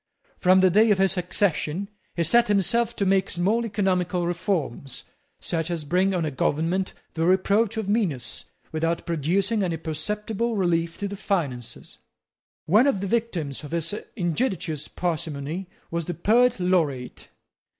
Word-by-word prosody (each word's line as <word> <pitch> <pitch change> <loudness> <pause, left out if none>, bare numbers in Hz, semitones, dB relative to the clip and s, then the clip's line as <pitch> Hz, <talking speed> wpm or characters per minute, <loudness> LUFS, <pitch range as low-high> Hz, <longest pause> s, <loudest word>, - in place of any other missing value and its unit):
From 185 +1 +5
the 185 -1 +5
day 215 +5 +5
of 205 - +4
his 190 0 +3
accession 180 -1 -1 0.3
he 170 - +1
set 235 +9 +4
himself 225 +4 +2
to 200 - 0
make 190 0 +2
small 205 +7 +1
economical 185 -3 0
reforms, 170 - -2 0.4
such 165 0 -2
as 170 -3 -2
bring 180 +6 +2
on 170 -3 0
a 155 - -2
government 165 +8 0 0.2
the 160 - -1
reproach 200 +4 +2
of 220 -3 -2
meanness 195 - -1 0.3
without 165 +1 -1
producing 185 +7 0
any 175 -4 -1
perceptible 210 +8 -3
relief 170 -3 0
to 200 - -3
the 200 - -5
finances. 155 - -3 0.7
One 215 - +5
of 200 -9 +1
the - - -2
victims 185 - -2
of 150 - -8
his 170 +2 -1 0.2
injudicious 175 - -1
parsimony 165 0 -3 0.2
was 170 -1 -2
the 175 - -4
Poet 235 +6 +3
Laureate. 160 -9 0
180 Hz, 150 wpm, -25 LUFS, 165-200 Hz, 0.7 s, From